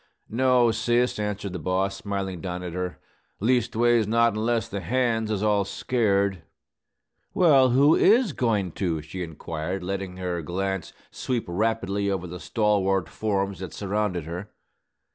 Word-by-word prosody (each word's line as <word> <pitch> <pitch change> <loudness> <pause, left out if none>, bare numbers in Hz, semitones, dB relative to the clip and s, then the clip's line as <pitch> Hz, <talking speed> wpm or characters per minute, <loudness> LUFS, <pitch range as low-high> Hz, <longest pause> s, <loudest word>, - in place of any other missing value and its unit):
"No, 125 0 +4
sis," 120 +2 +1
answered 105 -2 -3
the 90 - -4
boss, 95 +3 -1
smiling 95 -3 -4
down 90 -1 -4
at 90 -2 -5
her, 90 0 -3 0.4
"leastways, 120 -1 +2
not 115 +1 +3
unless 115 +2 0
the 100 - -4
hands 115 -3 0
is 105 -1 -1
all 105 -1 +3
scared." 100 -3 0 0.9
"Well, 140 -7 +5
who 140 +5 +5
is 220 - +4
goin' 105 -9 0
to?" 80 -4 -2
she 90 +4 -7
inquired, 85 +2 -4
letting 95 0 -4
her 90 -2 -3
glance 95 +2 -3 0.2
sweep 125 -3 -2
rapidly 100 +1 0
over 95 -2 -2
the 90 +1 -7
stalwart 95 -5 +1
forms 100 -3 -2
that 95 -2 -7
surrounded 100 -3 -1
her. 90 +6 -6
100 Hz, 145 wpm, -25 LUFS, 90-115 Hz, 0.9 s, Well